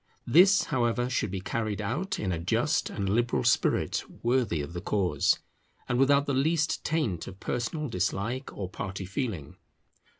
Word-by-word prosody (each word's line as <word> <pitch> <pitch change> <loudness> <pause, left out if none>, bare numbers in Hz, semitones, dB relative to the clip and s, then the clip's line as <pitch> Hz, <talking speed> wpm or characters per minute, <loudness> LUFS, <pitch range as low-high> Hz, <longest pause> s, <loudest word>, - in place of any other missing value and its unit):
This, 185 +9 +6
however, 120 -2 0
should 110 -5 0
be 95 0 -4
carried 110 +1 -2
out 150 - -2
in 95 - -1
a 85 - -2
just 115 - +1
and 100 -2 -3
liberal 115 - +1
spirit - - +2 0.2
worthy 120 -9 +1
of 70 +4 -7
the 85 - -4
cause, 100 -2 +1 0.5
and 120 - 0
without 140 +1 +4
the 140 - -1
least 150 +3 +1
taint 125 - -1
of 95 - -9
personal 150 +8 -2
dislike 110 +5 -2
or 95 - -5
party 95 0 -5
feeling. 100 - -4
115 Hz, 160 wpm, -28 LUFS, 95-140 Hz, 0.5 s, This